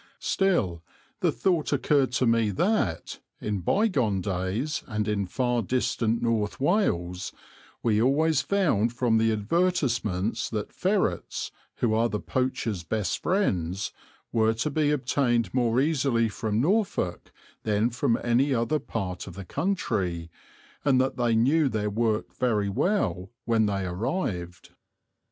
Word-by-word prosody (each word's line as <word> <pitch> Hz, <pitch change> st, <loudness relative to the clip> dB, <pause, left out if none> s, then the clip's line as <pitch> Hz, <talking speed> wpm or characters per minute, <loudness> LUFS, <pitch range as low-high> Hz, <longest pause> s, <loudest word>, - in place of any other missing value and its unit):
Still 100 Hz, -, 0 dB, 0.4 s
the -, -, +2 dB
thought 175 Hz, -5 st, 0 dB
occurred 140 Hz, -2 st, +2 dB
to 130 Hz, -, +2 dB
me 115 Hz, -2 st, +3 dB
that, 100 Hz, -, 0 dB, 0.2 s
in 105 Hz, -2 st, -2 dB
bygone 125 Hz, -, +1 dB
days 95 Hz, -, -2 dB
and 105 Hz, -3 st, -2 dB
in 100 Hz, -2 st, 0 dB
far 120 Hz, +4 st, 0 dB
distant 115 Hz, 0 st, 0 dB
North 110 Hz, -3 st, 0 dB
Wales, 90 Hz, -, 0 dB, 0.5 s
we 110 Hz, -2 st, +3 dB
always 145 Hz, +4 st, +3 dB
found 130 Hz, -, +1 dB
from 120 Hz, -3 st, +2 dB
the 115 Hz, 0 st, +3 dB
advertisements 115 Hz, -, 0 dB
that 105 Hz, -2 st, -4 dB
ferrets, 195 Hz, +1 st, -1 dB, 0.2 s
who 115 Hz, -3 st, +1 dB
are 115 Hz, +2 st, +2 dB
the 105 Hz, -, -2 dB
poachers' 115 Hz, -8 st, -2 dB
best 90 Hz, +1 st, -2 dB
friends, 95 Hz, -, 0 dB, 0.4 s
were 110 Hz, -1 st, +2 dB
to 140 Hz, +7 st, -1 dB
be 150 Hz, 0 st, +1 dB
obtained 125 Hz, -6 st, +1 dB
more 120 Hz, -1 st, +2 dB
easily 135 Hz, -6 st, +2 dB
from 105 Hz, 0 st, -2 dB
Norfolk 190 Hz, -, 0 dB, 0.3 s
than 110 Hz, +2 st, +1 dB
from 115 Hz, -1 st, +1 dB
any 130 Hz, +3 st, +2 dB
other 120 Hz, +7 st, +1 dB
part 95 Hz, -9 st, -4 dB
of 90 Hz, -, -9 dB
the 100 Hz, -1 st, -7 dB
country, 95 Hz, -, -2 dB, 0.5 s
and 135 Hz, -3 st, +4 dB
that 130 Hz, +1 st, +1 dB
they 120 Hz, -2 st, +2 dB
knew 140 Hz, +6 st, +3 dB
their 105 Hz, -3 st, -1 dB
work 110 Hz, 0 st, 0 dB
very 110 Hz, -5 st, 0 dB
well 100 Hz, -, 0 dB, 0.2 s
when 110 Hz, -2 st, +2 dB
they 100 Hz, -2 st, -1 dB
arrived. 90 Hz, -, -3 dB
115 Hz, 135 wpm, -27 LUFS, 105-140 Hz, 0.5 s, and